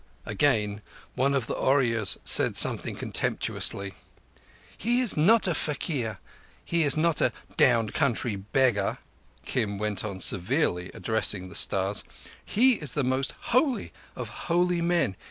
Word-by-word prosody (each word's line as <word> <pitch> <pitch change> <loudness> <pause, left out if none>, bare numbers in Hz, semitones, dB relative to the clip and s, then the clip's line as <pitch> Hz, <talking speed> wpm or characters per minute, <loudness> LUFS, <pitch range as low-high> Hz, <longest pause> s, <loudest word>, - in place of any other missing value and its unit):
Again 105 -2 0 0.3
one 140 +2 0
of 135 -5 -1
the - - -4
Ooryas 115 -6 +1
said - - +4
something - - +2
contemptuously. 100 -1 0 0.8
"He 240 +4 -1
is 250 -6 +3
not 210 +9 +4
a 175 - +1
faquir. 140 - -3 0.5
He 170 0 0
is 145 -1 +2
not 165 0 +1
a 125 - +2 0.2
down 115 -4 +2
country 120 -4 -1
beggar," 110 +2 0 0.5
Kim 110 -6 -2
went 105 -2 -2
on 100 -3 -6
severely, 95 - 0
addressing 105 -4 +1
the - - -13
stars. 95 +1 +2 0.4
"He 250 +2 +2
is 150 -4 -2
the 145 - -1
most 130 +1 -2 0.2
holy 255 +1 0 0.2
of - - -6 0.2
holy 175 0 +1
men. 170 - 0
130 Hz, 135 wpm, -26 LUFS, 105-165 Hz, 0.8 s, said